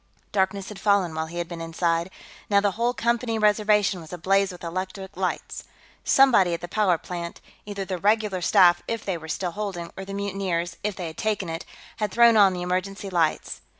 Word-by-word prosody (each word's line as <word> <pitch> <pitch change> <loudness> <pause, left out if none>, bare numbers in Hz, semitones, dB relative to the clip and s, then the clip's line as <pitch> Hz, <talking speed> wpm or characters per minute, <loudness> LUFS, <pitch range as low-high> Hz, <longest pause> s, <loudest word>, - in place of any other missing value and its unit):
Darkness 195 0 0
had 210 - -9
fallen, 200 -5 +2
while 160 0 -3
he 170 +2 -8
had 175 -1 -2
been 170 -1 -7
inside; 165 +1 -1 0.4
now 200 -1 +5
the 200 0 +1
whole 235 +4 0
Company 235 -1 0
Reservation 210 -2 +3
was 160 - -12
ablaze 195 +3 +1
with 180 - -12
electric 185 +2 -5
lights. 185 0 -3 0.4
Somebody 215 -11 +5
at - - -8
the 175 - -5
power 185 -2 +2
plant 170 0 -6 0.3
either 200 -1 -4
the 185 -2 -4
regular 210 -1 +1
staff, 175 -1 +5
if 230 -2 -3
they 190 - -1
were 160 - -10
still 175 +3 -2
holding, 190 -3 -5
or 190 - -6
the 195 +1 -7
mutineers, 190 -4 -2
if 210 -2 -1
they 180 - -5
had 160 -1 -7
taken 210 -5 -1
it 165 0 -5 0.3
had 210 -2 -1
thrown 235 +1 +6
on 200 -3 +6
the 180 -1 -4
emergency 190 +2 -3
lights. 165 -3 0
190 Hz, 200 wpm, -25 LUFS, 175-205 Hz, 0.4 s, thrown